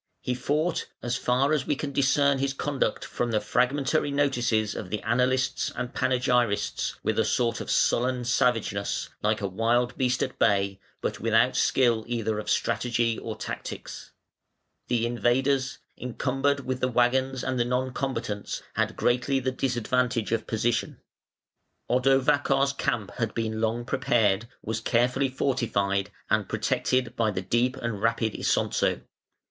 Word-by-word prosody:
He 125 - -2
fought 150 +6 -1 0.2
(as 120 0 -1
far 130 +4 +2
as 150 -4 0
we 145 - +1
can 140 0 -4
discern 140 0 +3
his 135 0 -1
conduct 140 -1 -1
from 120 - -2
the 110 -2 +2
fragmentary 130 +7 +1
notices 120 -7 +1
of 90 - -6
the 105 - -2
annalists 125 +3 +1
and 125 -1 -4
panegyrists) 125 -4 +1
with - - 0
a - - +4
sort 115 -2 0
of - - -7
sullen 125 0 +2
savageness, 115 -5 0
like 105 0 +1
a 100 - 0
wild 120 +5 +1
beast 130 0 +1
at - - -5
bay, 100 -1 +2 0.2
but - - -2
without - - +3
skill 120 -4 +3
either 110 -3 -1
of 105 - -5
strategy 115 -1 +1
or 110 -1 -5
tactics. - - -7 0.8
The 120 -2 +1
invaders, 130 +3 +1 0.2
encumbered 135 +3 0
with 130 0 -2
the 130 - +1
waggons 130 +2 +1
and 130 -1 -1
the 120 - +2
non 125 +1 -1
combatants, 115 -7 -3
had - - 0
greatly 125 +2 +1
the 130 0 -1
disadvantage 125 -2 0
of 115 - -1
position. 115 +1 -1 0.9
Odovacar's 135 +2 +3
camp 120 -8 -2
had 115 -3 -2
been 110 -1 -2
long 115 +2 0
prepared, 115 -6 +1 0.2
was 110 +1 -3
carefully 125 +4 +2
fortified, 110 -7 0 0.2
and - - +1
protected 125 -2 0
by 115 -2 +1
the 95 -2 -3
deep 120 +6 +1
and 115 -5 -4
rapid 115 -1 +1
Isonzo. - - 0
125 Hz, 145 wpm, -27 LUFS, 115-130 Hz, 0.9 s, a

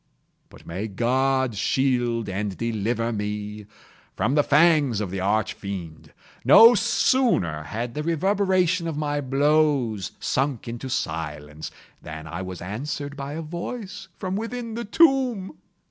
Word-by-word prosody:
But - - -16
may 95 +6 -4
God 130 +4 +1
shield 120 +1 0
and 100 0 -3
deliver 115 +1 -1
me 105 0 -4 0.5
from 115 +8 0
the 145 - +5
fangs 145 -6 +4
of 100 -4 -3
the 95 - -3
Arch 100 +3 +1
Fiend! 90 -6 -7 0.3
No 230 +2 +9
sooner 235 - +2
had 115 +5 -4
the 150 - -3
reverberation 185 +1 +1
of 160 -3 -3
my 145 -1 -1
blows 140 - +1
sunk 135 -3 -1
into 120 +3 -5
silence, 75 - -4 0.3
than 80 0 -8
I 85 +3 -5
was 90 -2 -7
answered 145 +8 -5
by 140 0 -6
a 165 +2 -4
voice 190 +5 -6
from 185 0 -3
within 230 +2 -4
the 235 +1 -4
tomb! 255 - +2
130 Hz, 135 wpm, -24 LUFS, 105-165 Hz, 0.5 s, No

